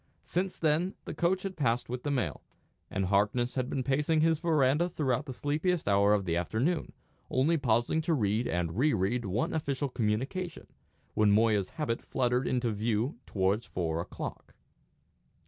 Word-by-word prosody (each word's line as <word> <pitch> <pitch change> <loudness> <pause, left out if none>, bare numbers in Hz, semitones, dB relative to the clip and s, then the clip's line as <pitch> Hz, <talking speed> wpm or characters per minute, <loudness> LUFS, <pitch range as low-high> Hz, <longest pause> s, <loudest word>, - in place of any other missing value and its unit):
Since 185 +2 -2
then 160 +4 +1
the - - -5
coach 185 +2 +1
had 195 -1 -4
passed 120 -5 0
with 125 +1 -4
the 145 - -3
mail; 135 -4 -1 0.5
and 95 0 -1
Harkness 105 +6 +1
had 130 -1 -2
been 130 - -1
pacing 150 +4 +2
his 160 -1 +3
verandah 155 0 +2
throughout 145 -3 -1
the - - -4
sleepiest 155 +6 -1
hour 100 +1 +4
of 100 -2 -1
the 85 -2 0
afternoon, 115 - -1 0.4
only 140 +6 +2
pausing 120 +2 +1
to 160 +1 +1
read 110 -1 +1
and 85 +3 -2
re 150 -1 +3
read 110 +5 0
one 100 +5 -1
official 140 -3 -1
communication, 130 - -2 0.5
when 105 -1 +3
Moya's 105 -2 +3
habit 140 -7 -1
fluttered 125 0 0
into 125 -2 0
view 110 +4 -1
towards 100 +3 0
four 85 -2 -2
o'clock. - - -7
125 Hz, 165 wpm, -30 LUFS, 105-155 Hz, 0.5 s, hour